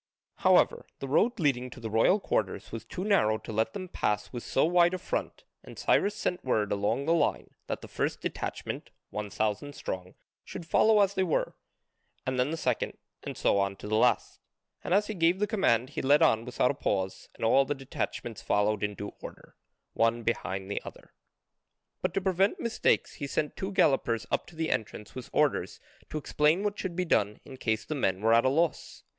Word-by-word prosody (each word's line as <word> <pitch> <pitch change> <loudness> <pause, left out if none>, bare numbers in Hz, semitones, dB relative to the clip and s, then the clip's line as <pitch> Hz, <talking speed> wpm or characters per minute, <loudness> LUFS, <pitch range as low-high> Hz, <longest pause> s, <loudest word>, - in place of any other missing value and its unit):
However - - +3
the 135 - -6
road 215 - +2
leading 130 -5 +1
to 125 - -11
the 110 -2 -5
royal 115 - +4
quarters 105 - -2
was 115 -1 -6
too 175 +10 -5
narrow 190 - +3
to 110 - -9
let 110 +1 0
them 185 - -5
pass 105 -10 -2
with 120 - -4
so 135 - +1
wide 175 +1 +4
a - - -2
front 185 - -4 0.2
and - - -12
Cyrus 205 +1 +2
sent 180 - -2
word 110 -5 0
along 105 +7 0
the 165 - +3
line 170 - 0 0.2
that - - -3
the - - -9
first - - -2
detachment, - - -4 0.2
one 105 -1 -4
thousand 110 +8 -2
strong, 90 -1 -5 0.3
should 170 - -8
follow 215 +5 +4
as 200 -1 +3
they 190 - 0
were, 180 -4 0 0.7
and 130 -1 -1
then 125 +3 +2
the 165 - -2
second, 125 -6 -1 0.2
and - - -6
so 100 - +2
on 100 0 0
to 100 - -9
the 110 - 0
last, 110 - +2 0.4
and - - -5
as 205 +1 +3
he 215 - -4
gave 170 -1 +3
the 210 - +1
command 145 - +1
he - - -3
led 145 +4 +5
on 115 -6 +3
without 125 0 +1
a - - -3
pause 95 -7 -2
and - - -3
all 135 +4 +5
the 145 - -2
detachments 125 -4 -5
followed 105 0 +1
in 105 0 -1
due 100 0 -6
order, - - -11 0.4
one 115 +1 +2
behind 95 -4 -2
the - - -2
other. - - -12 0.9
But - - -1
to 195 - +1
prevent 190 +1 +2
mistakes 235 - +1
he 140 - -2
sent 150 +2 -2
two 190 +1 -4
gallopers 120 - +2
up - - 0
to 175 - -14
the 160 0 -1
entrance 105 -1 -3
with 130 -2 -8
orders 150 -2 +1 0.3
to - - -4
explain 150 +4 +2
what 205 0 -2
should 185 -3 -3
be 180 +1 0
done 105 - +1
in 130 - -10
case 110 -3 -1
the - - -3
men 95 -10 0
were 115 +1 +4
at 115 +2 +5
a - - +5
loss. 160 +4 -1
130 Hz, 210 wpm, -29 LUFS, 110-170 Hz, 0.9 s, led